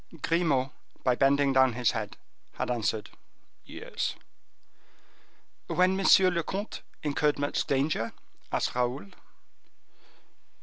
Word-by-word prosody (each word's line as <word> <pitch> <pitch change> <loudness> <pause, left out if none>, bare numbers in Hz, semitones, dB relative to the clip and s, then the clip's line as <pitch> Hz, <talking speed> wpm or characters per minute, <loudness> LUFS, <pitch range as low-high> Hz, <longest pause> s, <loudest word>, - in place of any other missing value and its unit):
Grimaud 150 -6 +1 0.3
by 125 - +3
bending 135 +2 +3
down 130 -2 +5
his 120 -1 +2
head - - -5 0.4
had - - -2
answered, 110 -2 -1 0.5
"Yes." - - -4 1.5
"When 185 +1 +3
monsieur 190 -1 +6
le 170 -1 0
comte 195 +6 -5 0.2
incurred 150 0 +1
much 145 0 -1
danger?" 135 -4 0 0.4
asked - - 0
Raoul. 125 -4 -2
140 Hz, 100 wpm, -28 LUFS, 125-165 Hz, 1.5 s, monsieur